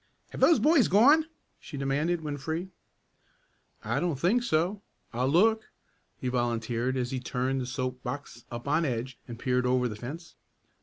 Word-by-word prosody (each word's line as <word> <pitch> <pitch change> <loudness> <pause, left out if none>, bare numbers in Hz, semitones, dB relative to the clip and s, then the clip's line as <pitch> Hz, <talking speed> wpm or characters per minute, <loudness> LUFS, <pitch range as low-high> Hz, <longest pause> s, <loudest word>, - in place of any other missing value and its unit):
"Have - - -7
those 335 - +6
boys 300 - +4
gone?" 285 - +5 0.3
she 145 - -9
demanded 145 +5 0
when 150 -2 -4
free. 160 +6 -4 1.1
"I 120 +5 -1
don't 165 -4 -1
think 200 - +3
so. 185 -1 0 0.3
I'll 125 +2 0
look," 220 +8 +3 0.5
he 130 - -4
volunteered 120 +1 -1
as 125 -1 -2
he 130 - -2
turned 130 +1 -1
the 125 - -4
soap 130 0 -3
box 140 -5 -6
up 120 +2 -7
on 155 +4 +2
edge 125 -3 -3
and 120 -2 -7
peered 125 0 0
over 125 0 +2
the 110 - -5
fence. 145 +10 -8
135 Hz, 165 wpm, -28 LUFS, 125-170 Hz, 1.1 s, those